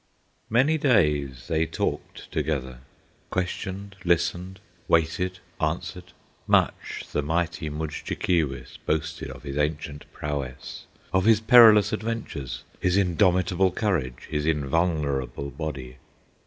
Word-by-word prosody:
Many 135 Hz, +8 st, +3 dB
days 75 Hz, -, +2 dB
they 80 Hz, -1 st, +1 dB
talked -, -, -4 dB
together, 70 Hz, -5 st, -2 dB, 0.5 s
Questioned, 95 Hz, +2 st, -4 dB
listened, 90 Hz, +2 st, 0 dB, 0.3 s
waited, 85 Hz, +3 st, +1 dB, 0.2 s
answered; 85 Hz, +3 st, -3 dB, 0.3 s
Much -, -, +1 dB
the -, -, 0 dB
mighty 80 Hz, +1 st, -1 dB
Mudjekeewis 75 Hz, 0 st, -2 dB
Boasted 80 Hz, -1 st, -1 dB
of 65 Hz, 0 st, -10 dB
his 70 Hz, 0 st, -5 dB
ancient 75 Hz, 0 st, -3 dB
prowess, 70 Hz, -4 st, -5 dB, 0.3 s
Of 95 Hz, 0 st, +3 dB
his 110 Hz, -2 st, +6 dB
perilous 110 Hz, -3 st, +7 dB
adventures, 110 Hz, -, -4 dB, 0.2 s
His 90 Hz, +1 st, +2 dB
indomitable 95 Hz, 0 st, +3 dB
courage, 85 Hz, -, -1 dB
His 75 Hz, 0 st, -2 dB
invulnerable 70 Hz, -3 st, 0 dB
body. 70 Hz, -6 st, -6 dB
80 Hz, 100 wpm, -26 LUFS, 75-95 Hz, 0.5 s, perilous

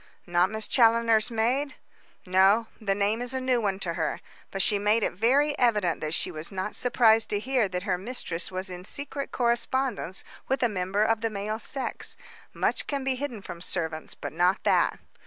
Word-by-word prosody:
"Not 175 Hz, +1 st, +2 dB
Miss 220 Hz, 0 st, -3 dB
Challoner's 230 Hz, -2 st, +4 dB
maid?" 245 Hz, +6 st, 0 dB, 0.5 s
"No; 190 Hz, +4 st, +4 dB, 0.2 s
the 200 Hz, -2 st, 0 dB
name 205 Hz, +3 st, 0 dB
is 245 Hz, +1 st, -3 dB
a -, -, 0 dB
new 255 Hz, -2 st, +1 dB
one 195 Hz, -3 st, 0 dB
to 170 Hz, -3 st, -2 dB
her. -, -, -2 dB, 0.3 s
But 195 Hz, -1 st, 0 dB
she 205 Hz, -, +2 dB
made 210 Hz, +2 st, +2 dB
it -, -, 0 dB
very 275 Hz, +9 st, +2 dB
evident 210 Hz, -9 st, +2 dB
that 155 Hz, +1 st, -1 dB
she -, -, 0 dB
was 155 Hz, +2 st, -5 dB
not 190 Hz, +2 st, -3 dB
surprised 225 Hz, -3 st, +4 dB
to 205 Hz, -, 0 dB
hear 250 Hz, -1 st, +1 dB
that 180 Hz, 0 st, -3 dB
her 185 Hz, -3 st, -1 dB
mistress 185 Hz, -6 st, -3 dB
was 185 Hz, +1 st, -4 dB
in 180 Hz, 0 st, -7 dB
secret 280 Hz, +5 st, -4 dB
correspondence 240 Hz, -4 st, 0 dB, 0.2 s
with 265 Hz, 0 st, 0 dB
a -, -, +5 dB
member 195 Hz, +1 st, 0 dB
of 225 Hz, 0 st, +1 dB
the 225 Hz, -, 0 dB
male 215 Hz, +1 st, -4 dB
sex. 270 Hz, +2 st, -4 dB, 0.3 s
Much -, -, -1 dB
can 280 Hz, -2 st, -2 dB
be 265 Hz, 0 st, +1 dB
hidden 250 Hz, -6 st, -5 dB
from 170 Hz, -, -8 dB
servants, 160 Hz, -3 st, -2 dB
but -, -, -7 dB
not 180 Hz, +4 st, +2 dB
that." -, -, +2 dB
215 Hz, 195 wpm, -27 LUFS, 185-245 Hz, 0.5 s, a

